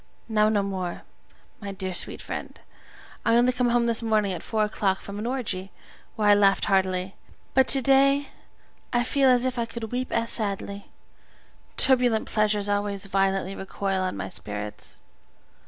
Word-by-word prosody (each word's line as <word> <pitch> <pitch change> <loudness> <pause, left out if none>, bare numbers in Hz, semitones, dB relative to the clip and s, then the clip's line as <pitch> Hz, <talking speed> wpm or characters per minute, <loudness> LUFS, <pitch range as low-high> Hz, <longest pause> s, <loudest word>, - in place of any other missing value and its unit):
Now 215 -1 +3
no 205 -2 +1
more, 185 -3 -4 0.6
my 200 -2 -6
dear 190 -1 -4
sweet - - -1
friend! - - -6 0.6
I 230 - +3
only 245 +1 +4
came 250 -1 +1
home 235 0 +2
this 230 -1 +1
morning 215 -3 +1
at 180 - -5
four 220 -1 -1
o'clock 195 -2 0
from 200 +1 -8
an 220 - -3
orgy, 210 -7 -3 0.4
where 210 -1 0
I - - +8
laughed 200 -1 +3
heartily, 190 -1 +1 0.4
but 265 -1 +4
to 270 -2 +5
day 275 +2 +4 0.6
I 240 -1 +2
feel 270 +2 +3
as 250 0 +4
if 255 -1 -1
I 230 - -1
could 225 -2 -7
weep 250 +1 -3
as 230 0 0
sadly; 200 -2 -3 0.9
turbulent 245 -4 +3
pleasures 210 -1 +1
always 205 -1 -1
violently 195 -1 0
recoil 195 0 -2
on 185 - -2
my 95 -1 -4
spirits. 105 +2 -8
210 Hz, 165 wpm, -25 LUFS, 195-240 Hz, 0.9 s, I